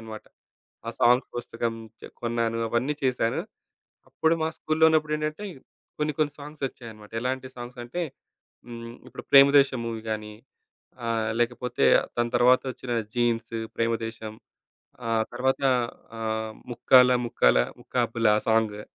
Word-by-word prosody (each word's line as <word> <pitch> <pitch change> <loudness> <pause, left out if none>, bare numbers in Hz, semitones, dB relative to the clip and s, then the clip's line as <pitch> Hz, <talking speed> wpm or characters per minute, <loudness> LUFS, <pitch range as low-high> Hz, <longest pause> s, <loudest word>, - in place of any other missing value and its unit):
అనమాట. 110 -1 -9 0.6
ఆ - - 0
సాంగ్స్ 125 +2 +4
పుస్తకం 115 -1 -3 0.3
చె - - -10
కొన్నాను. 115 -1 -1
అవన్నీ 125 +6 0
చేశాను. 125 -3 +1 0.7
అప్పుడు 160 +1 +2
మా 160 - +1
స్కూలులో 155 +1 +2
ఉన్నప్పుడేంటంటే 155 +3 0 0.6
కొన్ని 150 0 0
కొన్ని 150 -2 +1
సాంగ్స్ 145 0 -9
వచ్చాయన్నమాట. 110 -5 -13
ఎలాంటి 130 +1 -2
సాంగ్స్ 120 0 -9
అంటే 125 +9 -4 0.7
హ్మ్. 115 -1 -8 0.2
ఇప్పుడు - - -9
'ప్రేమ 140 0 +9
దేశం' 130 -3 +1
మూవీ 115 -1 -4
కానీ 105 0 -4 0.7
ఆహ్, 110 -1 0
లేకపోతే 120 +1 -1 0.3
దాని 120 0 0
తర్వాత 125 +1 +5
వచ్చిన 125 +1 -8 0.2
'జీన్స్', 120 -1 0 0.2
'ప్రేమ 115 0 +1
దేశం' 110 -1 -7 0.7
ఆహ్, 115 -1 +2
తరువాత 130 +3 0 0.6
ఆహ్, 110 0 -2 0.2
'ముక్కాల 125 +1 +6
ముక్కాల 60 - +3 0.2
ముక్కాబుల' 115 -2 +1
ఆ - - +3
సాంగు. 110 -2 +1
120 Hz, 130 wpm, -26 LUFS, 115-130 Hz, 0.7 s, ప్రేమ